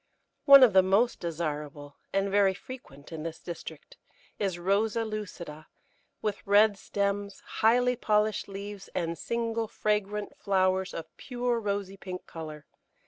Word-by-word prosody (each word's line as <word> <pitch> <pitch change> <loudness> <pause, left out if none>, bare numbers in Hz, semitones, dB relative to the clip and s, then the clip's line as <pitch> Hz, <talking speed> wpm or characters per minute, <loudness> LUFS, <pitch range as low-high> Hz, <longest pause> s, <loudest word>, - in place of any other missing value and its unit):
One 275 -2 +10
of 235 -6 +6
the 190 - +8
most 200 +6 +2
desirable, 150 -4 -4 0.2
and 195 0 0
very 195 -1 +4
frequent 170 - -11
in 160 -2 -5
this 165 0 -5
district, 160 -3 -9 0.4
is 195 -4 -1
Rosa 205 +5 +1
lucida, 175 -8 -6 0.6
with 210 -2 -2
red 205 +1 +6
stems, 200 0 -2
highly 245 +3 +2
polished 215 -2 +1
leaves, 200 0 -7
and 170 -2 -1
single, 230 +2 -2
fragrant 210 -1 -1
flowers 190 -1 +1
of 165 - -7
pure 245 -2 -1
rosy 200 -2 -3
pink 185 -1 -7
colour. 155 -3 -8
200 Hz, 135 wpm, -29 LUFS, 175-215 Hz, 0.6 s, One